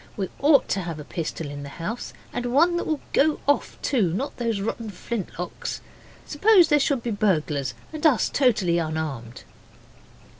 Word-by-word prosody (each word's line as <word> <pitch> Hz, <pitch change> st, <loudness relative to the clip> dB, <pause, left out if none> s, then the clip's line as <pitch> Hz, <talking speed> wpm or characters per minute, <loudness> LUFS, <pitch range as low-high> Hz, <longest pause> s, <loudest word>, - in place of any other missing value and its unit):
We 195 Hz, -3 st, -2 dB
ought 285 Hz, 0 st, +5 dB
to -, -, +1 dB
have 165 Hz, -3 st, -5 dB
a -, -, -6 dB
pistol 160 Hz, 0 st, -4 dB
in 145 Hz, 0 st, -7 dB
the 140 Hz, -, -7 dB
house, 195 Hz, +11 st, -5 dB, 0.2 s
and 245 Hz, 0 st, -2 dB
one 320 Hz, +8 st, +4 dB
that -, -, -3 dB
will 310 Hz, -2 st, -1 dB
go 305 Hz, +2 st, +3 dB
off, 285 Hz, -, +1 dB
too 215 Hz, -, +2 dB
not 265 Hz, +10 st, -3 dB
those 230 Hz, -4 st, -1 dB
rotten 220 Hz, +2 st, -3 dB
flintlocks. 185 Hz, -3 st, -5 dB, 0.5 s
Suppose 370 Hz, +3 st, +5 dB
there 295 Hz, -, +5 dB
should 275 Hz, -3 st, +1 dB
be 235 Hz, -, -2 dB
burglars 155 Hz, -9 st, 0 dB, 0.2 s
and 310 Hz, -, -6 dB
us 295 Hz, -8 st, +4 dB
totally 200 Hz, -10 st, +2 dB
unarmed? 155 Hz, -7 st, -4 dB
215 Hz, 165 wpm, -24 LUFS, -, 0.5 s, ought